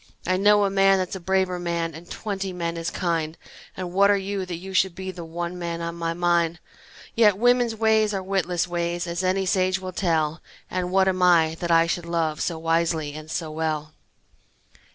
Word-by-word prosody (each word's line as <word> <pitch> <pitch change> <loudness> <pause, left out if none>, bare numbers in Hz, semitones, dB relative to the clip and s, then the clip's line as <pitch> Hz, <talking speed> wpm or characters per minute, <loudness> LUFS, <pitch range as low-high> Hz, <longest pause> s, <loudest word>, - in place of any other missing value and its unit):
I 185 - +2
know 205 +2 +4
a 195 - 0
man 195 0 +4
that's 185 0 -2
a - - -5
braver 185 0 0
man 170 -1 -2
And 165 +3 -11
twenty 195 -3 -4
men 170 -2 -3
as 165 0 -3
kind, 165 -3 -2 0.4
And 180 -2 -5
what 200 +2 +5
are 205 - +4
you, 195 -1 -3
that 175 - -4
you 190 +3 -8
should 190 -1 +2
be 190 0 -5
The 175 -2 -8
one 170 +2 -5
man 170 -1 -3
on 170 0 -4
my 165 0 -3
mind? 170 -1 +1 0.5
Yet 210 -4 +4
women's 245 0 +3
ways 220 -1 +3
are 195 -2 -3
witless 185 -2 0
ways, 175 0 -2
As 170 +1 -3
any 190 +1 +1
sage 185 0 +2
will 185 -1 -6
tell, 160 -4 0 0.3
And 180 -1 -2
what 190 0 +3
am 185 -1 0
I, 165 -3 +4
that 175 - -3
I 165 0 +5
should 170 0 -3
love 165 -2 -1
So 170 - -1
wisely 165 -2 0
and 155 +1 -9
so 160 -1 -3
well? 155 -1 -3
175 Hz, 205 wpm, -24 LUFS, 165-190 Hz, 0.5 s, what